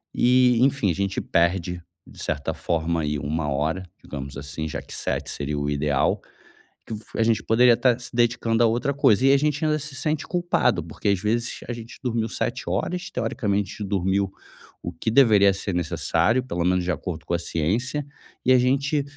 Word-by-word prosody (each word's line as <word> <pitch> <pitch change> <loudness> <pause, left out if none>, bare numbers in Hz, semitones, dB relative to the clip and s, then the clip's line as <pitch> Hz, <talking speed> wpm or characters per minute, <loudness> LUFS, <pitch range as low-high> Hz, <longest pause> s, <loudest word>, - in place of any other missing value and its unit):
e 125 0 +4
enfim, 135 -6 +2
a - - -2
gente 100 -1 -1
perde, 85 +1 0 0.3
de - - -14
certa 70 - -2
forma 85 0 -1
aí, 75 -1 -1
1 75 +1 -2
hora, 80 +7 -1 0.2
digamos 70 -1 -7
assim, 70 +2 -5
já - - -4
que - - -11
7 - - -2
seria 75 +1 -3
o 70 0 -1
ideal, 75 -1 +1 0.7
que - - -5 0.3
a 115 - +4
gente 115 -1 +2
poderia 120 +1 +5
tá 125 -3 +3
se 125 - -7
dedicando 120 -1 +2
a 115 - +6
outra 120 +5 0
coisa. 130 -3 +3
E 135 - +6
a 140 - +6
gente 150 +1 0
ainda 155 0 +1
se 150 -1 -6
sente 150 +3 -2
culpado, 175 - +1
porque 80 +5 -6
às 100 -2 +2
vezes 115 +4 -1
a 120 - -3
gente 115 0 -10
dormiu 115 -3 -1
7 - - -3
horas, 180 - -2
teoricamente 105 -4 -2
dormiu 95 0 0 0.5
o - - -4
que - - -3
deveria 110 -6 +6
ser 100 -1 -4
necessário, 90 +7 +1
pelo 90 -9 -2
menos 90 0 +2
de 90 - 0
acordo 80 +1 -5
com - - -3
a - - -1
ciência, 115 - -1 0.4
e 130 - +4
a 130 - +6
gente 140 +3 +1
105 Hz, 190 wpm, -24 LUFS, 85-125 Hz, 0.7 s, a